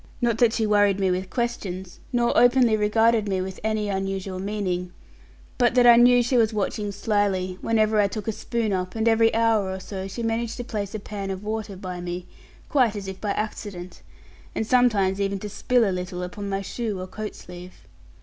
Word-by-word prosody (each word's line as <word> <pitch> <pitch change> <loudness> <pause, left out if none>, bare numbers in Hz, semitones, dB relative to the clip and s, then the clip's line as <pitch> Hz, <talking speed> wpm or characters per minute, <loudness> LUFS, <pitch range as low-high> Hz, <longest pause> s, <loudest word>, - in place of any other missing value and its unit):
Not 235 -3 +1
that 235 -2 +4
she 225 - 0
worried 205 -2 +3
me 190 -1 +2
with 185 +1 -2
questions, 190 -7 -4
nor 240 -1 +1
openly 245 -2 +5
regarded 220 +1 +2
me 190 -1 0
with 190 0 -5
any 215 -1 0
unusual 195 -1 -3
meaning, 185 -3 -2 0.7
but 245 0 +3
that 245 -1 +5
I 240 -1 +9
knew 245 +1 +6
she 245 +2 +1
was 225 -2 +3
watching 205 0 -2
slyly 200 -3 -1
whenever 215 -1 +2
I 200 - +3
took 210 +1 -6
a - - +2
spoon 220 0 -2
up; 185 +1 -3
and 225 +1 0
every 225 0 +4
hour 225 -4 +2
or 190 0 -4
so 190 0 -6
she 195 +5 -6
managed 225 0 -2
to 245 - -4
place 210 -4 -4
a - - -3
pan 200 -1 -6
of 190 +1 -5
water 215 -2 -4
by 185 -1 -6
me, 175 0 -5 0.4
quite 250 -7 +2
as 200 -2 -5
if 190 0 -7
by 205 -2 -1
accident, 190 -4 -5 0.5
and 220 - -1
sometimes 210 -6 +3
even 200 0 0
to 210 +2 -6
spill 235 +3 +2
a 190 - 0
little 180 0 -4
upon 200 +3 -6
my 195 0 -2
shoe 215 -1 -4
or 185 - -4
coat 210 +3 -6
sleeve. 180 0 -12
205 Hz, 205 wpm, -24 LUFS, 190-225 Hz, 0.7 s, I